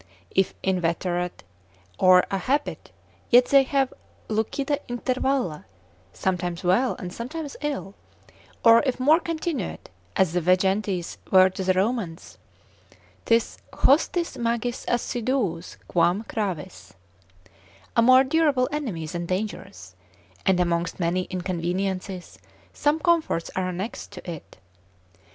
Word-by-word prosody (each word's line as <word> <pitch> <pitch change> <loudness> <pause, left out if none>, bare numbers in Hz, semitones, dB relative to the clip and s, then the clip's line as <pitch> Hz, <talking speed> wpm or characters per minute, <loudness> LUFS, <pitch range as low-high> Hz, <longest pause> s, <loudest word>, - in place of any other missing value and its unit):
If 190 0 +1
inveterate, 180 - -1 0.6
or 185 -1 +6
a 195 - 0
habit, 280 +9 -2 0.4
yet 245 +1 +7
they 275 +1 +6
have 270 0 0 0.4
lucida 275 +7 -1
intervalla, 250 - -1 0.5
sometimes 180 - -2
well, 190 +9 +2
and 180 -6 -7
sometimes 285 +5 -6
ill; 280 -10 -3 0.7
or 230 0 +8
if 260 - -1
more 300 +6 +5
continuate, 320 - -4 0.2
as 185 -4 +2
the 180 - +1
Vejentes 185 +1 +1
were 185 0 +6
to 190 - -4
the 185 0 +3
Romans, 190 -3 -2 0.9
'tis 230 0 +1
hostis 335 +4 +2
magis 235 +1 -1
assiduus 240 -7 -1
quam 175 +5 +2
gravis, 190 - -5 1.0
a - - +5
more 255 +2 +7
durable 280 -3 +2
enemy 235 - -3
than 170 +2 -5
dangerous: 200 +4 -5 0.5
and 190 -2 +4
amongst 170 0 0
many 180 +1 0
inconveniences, 185 +1 -3 0.3
some 295 +2 +1
comforts 330 - +1
are 185 -1 -1
annexed 185 +5 -5
to 185 - -10
it. 160 - -10
195 Hz, 115 wpm, -25 LUFS, 180-255 Hz, 1.0 s, or